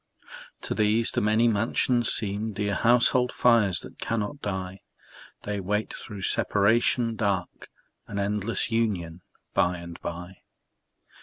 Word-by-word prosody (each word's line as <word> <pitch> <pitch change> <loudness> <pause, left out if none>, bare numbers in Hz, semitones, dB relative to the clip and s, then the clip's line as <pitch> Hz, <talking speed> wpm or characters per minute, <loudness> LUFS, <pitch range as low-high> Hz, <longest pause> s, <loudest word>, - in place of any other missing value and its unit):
To - - -3
these 110 +2 +2
the - - -1
many 110 +3 +3
mansions 115 +2 +1
seem 105 +1 -1
Dear 100 0 -2
household 125 +4 +3
fires 110 -8 +3
that - - -13
cannot 115 +5 -3
die; 95 -1 -4 0.6
They 105 -1 -3
wait 105 +3 -2
through 100 -3 -8
separation 115 +4 +2
dark 100 -4 -2 0.4
An 100 - -6
endless 105 +2 -1
union 95 -7 -1 0.3
by 90 0 +1
and 85 0 -10
by. 90 +2 -7
105 Hz, 125 wpm, -26 LUFS, 95-115 Hz, 0.6 s, many